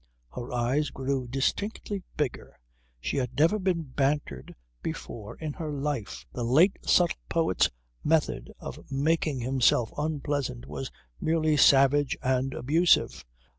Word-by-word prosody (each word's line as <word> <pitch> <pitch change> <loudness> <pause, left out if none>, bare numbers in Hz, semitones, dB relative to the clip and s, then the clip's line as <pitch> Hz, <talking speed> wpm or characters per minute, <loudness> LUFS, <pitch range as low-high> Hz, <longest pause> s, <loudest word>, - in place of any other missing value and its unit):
Her 120 0 -6
eyes 125 +4 +1
grew 135 -1 -2
distinctly 200 - -2 0.2
bigger. 140 - -3 0.4
She 65 - -2
had 125 -2 -2
never 165 +9 +4
been 180 -3 0
bantered 135 - -2 0.3
before 105 -3 -6
in 155 -2 -5
her 155 -2 -5
life. 135 - -3
The 120 - -3
late 155 - +4
subtle 175 -2 +3
poet's 165 - +2 0.3
method 155 0 +1
of - - -7
making 145 -1 +1
himself 125 -2 +2
unpleasant 145 - -2
was 70 -1 -5 0.3
merely 155 -1 +2
savage 140 0 +5
and 130 +1 0
abusive. 160 +7 +2
140 Hz, 125 wpm, -28 LUFS, 125-155 Hz, 0.4 s, savage